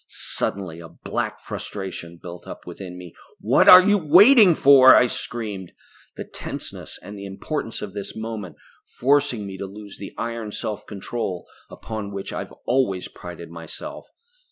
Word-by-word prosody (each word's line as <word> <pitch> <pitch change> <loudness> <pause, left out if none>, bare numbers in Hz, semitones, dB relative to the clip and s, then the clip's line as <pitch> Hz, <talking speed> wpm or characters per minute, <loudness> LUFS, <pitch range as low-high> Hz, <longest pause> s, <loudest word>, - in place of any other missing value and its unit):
Suddenly 90 -4 -4
a 85 -1 -10
black - - -4
frustration 90 -4 -7
built 85 +1 -10
up - - -9
within 90 -2 -8
me. 90 -2 -11 0.3
"What - - +4
are 185 0 +11
you 205 +1 +3
waiting 190 - +7
for?" 135 -2 +8
I - - +6
screamed, 105 -6 -5 0.4
the - - -4
tenseness, - - -8
and 105 - -9
the 100 - -7
importance 115 +5 -4
of 100 -3 -7
this 100 -1 -6
moment 110 -6 -6 0.3
forcing 135 -4 +1
me 95 -1 -8
to 100 - -4
lose 100 +1 -11
the 100 - -9
iron 115 -2 -4
self 105 -1 -5
control 100 -2 -4 0.2
upon 110 -2 -6
which 100 -1 -6
I - - -3
have - - -7
always 120 -8 0
prided 85 -1 -10
myself. 85 -1 -9
105 Hz, 155 wpm, -23 LUFS, 95-125 Hz, 0.4 s, are